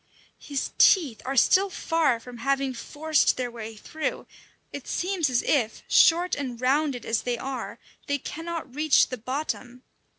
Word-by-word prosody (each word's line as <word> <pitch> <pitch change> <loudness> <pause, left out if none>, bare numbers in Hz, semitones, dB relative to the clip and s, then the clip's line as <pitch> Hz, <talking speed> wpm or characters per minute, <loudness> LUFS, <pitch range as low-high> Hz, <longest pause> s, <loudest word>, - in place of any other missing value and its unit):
His 280 -2 -4
teeth 300 - +4
are 270 +1 -2
still 390 +10 +4
far 325 -9 0
from 245 +1 -11
having 275 +2 0
forced 300 +5 +1
their 250 -1 -3
way 225 -1 -8
through; 310 +8 -4 0.5
it 285 - -7
seems 355 -5 -1
as 245 -2 +1
if, 240 -7 0
short 345 +2 +4
and 255 -5 -3
rounded 270 0 0
as 225 -1 0
they 245 -1 -2
are, 265 +1 -5 0.3
they 285 - 0
cannot 325 -1 -6
reach 305 0 +3
the 255 - -5
bottom. 255 0 -5
275 Hz, 155 wpm, -26 LUFS, 245-310 Hz, 0.5 s, teeth